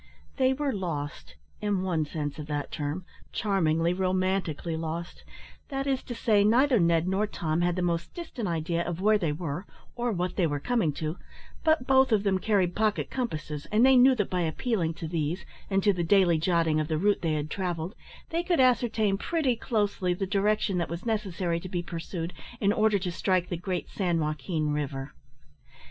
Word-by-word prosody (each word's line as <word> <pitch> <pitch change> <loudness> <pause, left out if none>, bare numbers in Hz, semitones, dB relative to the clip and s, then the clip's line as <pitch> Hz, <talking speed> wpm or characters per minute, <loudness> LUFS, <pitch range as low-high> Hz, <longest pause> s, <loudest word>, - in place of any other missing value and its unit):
They 260 -1 +4
were 285 0 -1
lost, 155 -7 -4 0.3
in 205 -3 0
one 165 -5 0
sense 145 -2 -4
of 150 - -6
that 145 -1 -3
term 150 +5 -3 0.3
charmingly, 170 -5 +1
romantically 185 -3 0
lost 165 +2 -5 0.5
that 270 -1 -2
is 270 -2 0
to 240 - -5
say, 215 -3 +3
neither 245 +4 +4
Ned 170 -1 +3
nor 195 +3 +1
Tom 165 -4 -1
had 175 0 +1
the 180 - -1
most 170 -1 -1
distant 285 - -5
idea 170 0 -1
of 170 0 -3
where 210 +2 +4
they 165 -6 0
were, 165 +3 -4 0.3
or 240 0 -1
what 180 -2 -2
they 180 -4 +3
were 145 -1 -2
coming 225 - +1
to, 155 +4 -4 0.4
but 315 -5 +3
both 265 -1 +4
of 210 -2 +3
them 195 -2 +2
carried 190 -4 +1
pocket 215 -1 0
compasses, 155 - -4
and 220 +4 +4
they 265 0 +7
knew 255 +1 +7
that 205 -5 -1
by 180 -1 +1
appealing 170 0 -1
to 165 - -5
these, 160 +2 -2 0.2
and 195 -1 +1
to 205 - +4
the 175 -2 -1
daily 175 -2 +4
jotting 165 -2 +2
of 155 - -1
the 155 -1 0
route 205 +5 +2
they 165 -2 0
had 150 0 -2
travelled, 175 -1 -2 0.4
they 335 +1 +1
could 345 -2 +1
ascertain 230 -5 +3
pretty 305 -5 +1
closely 205 -6 0
the 195 - -2
direction 200 -1 +1
that 170 - -2
was 170 +4 -5
necessary 185 -6 -1
to 185 - -8
be 175 -1 -2
pursued 170 0 -5 0.3
in 200 0 +3
order 215 -2 +3
to 180 -2 -3
strike 180 +1 0
the 175 - -1
great 180 +1 -3
San 175 -4 0
Joaquin 155 0 -1
river. 140 -2 -3
185 Hz, 190 wpm, -28 LUFS, 165-215 Hz, 0.5 s, they